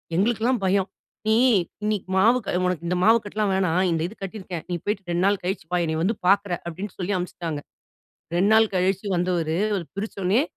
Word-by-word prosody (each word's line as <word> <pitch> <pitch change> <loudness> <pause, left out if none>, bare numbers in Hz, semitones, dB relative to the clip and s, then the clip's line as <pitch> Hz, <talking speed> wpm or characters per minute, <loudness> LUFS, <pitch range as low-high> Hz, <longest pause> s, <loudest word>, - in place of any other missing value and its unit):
எங்களுக்கெல்லாம் 230 +5 +1
பயம். 190 0 +2 0.4
"நீ 220 - +4 0.5
இன்னிக்கு 210 -3 -1
மாவு 225 +6 +5
க - - -2
உனக்கு 180 -2 -1
இந்த 180 - 0
மாவு 225 +4 +6
கட்டலாம் 205 0 -1
வேணாம், 185 -2 +2
இந்த 165 -1 0
இது 210 - -11
கட்டிருக்கேன். 185 -4 -6
நீ 175 - -1
போய்ட்டு 195 -3 -3
2 175 +1 +1
நாள் 200 0 +2
கழிச்சு 185 -2 -3
வா. - - +3
என்னைய 160 0 -1
வந்து 215 +6 +1
பாக்குற." 200 0 +3
அப்படின்னு 180 +4 -6
சொல்லி 195 +2 -2
அனுப்பிச்சிட்டாங்க. 170 -4 -4 0.8
2 195 +4 +3
நாள் 220 0 +5
கழிச்சு 190 +2 +1
வந்தவரு, 175 -2 0 0.2
அவரு 185 -4 -2
பிரிச்சோன்னயே, 200 +3 0
190 Hz, 180 wpm, -24 LUFS, 175-210 Hz, 0.8 s, மாவு